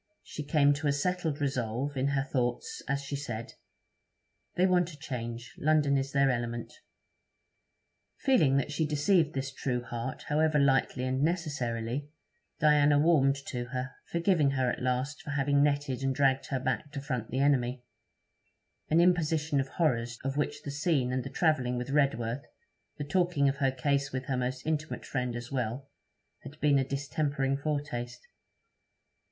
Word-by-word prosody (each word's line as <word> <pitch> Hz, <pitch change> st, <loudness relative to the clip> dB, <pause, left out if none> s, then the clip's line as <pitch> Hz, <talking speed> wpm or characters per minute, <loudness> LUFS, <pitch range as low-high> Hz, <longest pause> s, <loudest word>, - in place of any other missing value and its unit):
She -, -, -7 dB
came 145 Hz, 0 st, +3 dB
to 145 Hz, +1 st, -2 dB
a -, -, +4 dB
settled 160 Hz, +1 st, -1 dB
resolve 135 Hz, 0 st, -2 dB
in 135 Hz, +1 st, +1 dB
her 140 Hz, -1 st, +1 dB
thoughts, 125 Hz, -3 st, -2 dB
as 140 Hz, +1 st, -1 dB
she 140 Hz, 0 st, -4 dB
said, 120 Hz, -5 st, -5 dB, 1.0 s
'They 180 Hz, -, +3 dB
want 180 Hz, -2 st, +2 dB
a -, -, -12 dB
change. 120 Hz, -3 st, -6 dB
London 150 Hz, -2 st, +3 dB
is 135 Hz, 0 st, -1 dB
their 140 Hz, -1 st, +3 dB
element.' 120 Hz, -1 st, -3 dB, 1.4 s
Feeling 155 Hz, -, +3 dB
that 140 Hz, +2 st, -1 dB
she 155 Hz, +1 st, 0 dB
deceived 155 Hz, +1 st, +2 dB
this 135 Hz, 0 st, -2 dB
true 125 Hz, -2 st, -2 dB
heart, 120 Hz, +2 st, -5 dB
however 155 Hz, +1 st, +2 dB
lightly 135 Hz, -2 st, +2 dB
and 130 Hz, +1 st, 0 dB
necessarily, 140 Hz, -5 st, -1 dB, 0.5 s
Diana 150 Hz, -1 st, +5 dB
warmed 145 Hz, -3 st, +4 dB
to 120 Hz, -2 st, -4 dB
her, 130 Hz, +2 st, -4 dB, 0.2 s
forgiving 170 Hz, -4 st, +3 dB
her 130 Hz, -2 st, +1 dB
at -, -, -5 dB
last 130 Hz, +3 st, -1 dB
for -, -, -9 dB
having 140 Hz, 0 st, +2 dB
netted 145 Hz, -3 st, +1 dB
and 135 Hz, -1 st, 0 dB
dragged 135 Hz, -1 st, +2 dB
her 135 Hz, -, -1 dB
back 130 Hz, +2 st, -2 dB
to 140 Hz, -, -3 dB
front 125 Hz, -5 st, -3 dB
the 130 Hz, -, -3 dB
enemy; 130 Hz, -3 st, +2 dB, 1.1 s
an 160 Hz, -, +4 dB
imposition 160 Hz, -4 st, +2 dB
of 135 Hz, -, -1 dB
horrors, 120 Hz, -7 st, 0 dB
of 135 Hz, +1 st, -2 dB
which 145 Hz, 0 st, -2 dB
the 140 Hz, -, -4 dB
scene 140 Hz, -4 st, +1 dB
and 130 Hz, -1 st, -1 dB
the 135 Hz, -, -6 dB
travelling 135 Hz, -5 st, +1 dB
with 125 Hz, +2 st, -4 dB
Redworth, 135 Hz, -4 st, +1 dB, 0.6 s
the 145 Hz, -, -3 dB
talking 150 Hz, -1 st, +2 dB
of 135 Hz, 0 st, 0 dB
her 135 Hz, -1 st, +2 dB
case 140 Hz, +1 st, 0 dB
with 130 Hz, 0 st, -3 dB
her 135 Hz, -, -1 dB
most 125 Hz, 0 st, -3 dB
intimate 155 Hz, 0 st, -2 dB
friend 125 Hz, -3 st, -2 dB
as 120 Hz, +2 st, -6 dB
well, 130 Hz, +1 st, -3 dB, 0.5 s
had 140 Hz, +3 st, -11 dB
been 145 Hz, -1 st, +4 dB
a -, -, +2 dB
distempering 140 Hz, 0 st, -1 dB
foretaste. 135 Hz, -5 st, -4 dB
140 Hz, 165 wpm, -30 LUFS, 125-150 Hz, 1.4 s, Diana